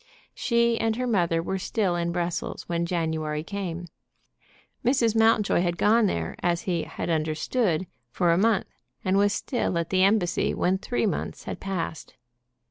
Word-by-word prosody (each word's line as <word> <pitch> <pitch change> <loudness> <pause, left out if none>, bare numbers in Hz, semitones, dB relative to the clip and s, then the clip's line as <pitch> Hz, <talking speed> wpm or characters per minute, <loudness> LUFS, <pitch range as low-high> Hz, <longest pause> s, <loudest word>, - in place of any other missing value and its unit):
She 235 -1 +2
and 225 -1 +1
her 250 +2 -2
mother 170 -8 +1
were 190 +2 -2
still 190 -2 0
at 170 0 -1
Brussels 175 0 -3
when 170 0 -1
January 160 -3 -1
came. 180 -2 -4 1.0
Mrs. 240 -3 +2
Mountjoy 225 -4 +4
had 175 -1 0
gone 220 +3 +4
there, 85 - -2
as 170 -1 +1
he 175 -3 -1
had - - -4
understood, 160 +4 0 0.2
for 175 +7 +2
a - - +4
month, 215 +3 +2 0.4
and 185 +1 +2
was 205 +1 +4
still 210 -4 -1
at 170 0 -2
the 185 -1 +3
embassy 195 -3 +2
when 185 +1 +1
three 245 +3 -1
months 205 - -3
had - - -6
passed. 185 -5 -4
185 Hz, 160 wpm, -26 LUFS, 170-215 Hz, 1.0 s, Mountjoy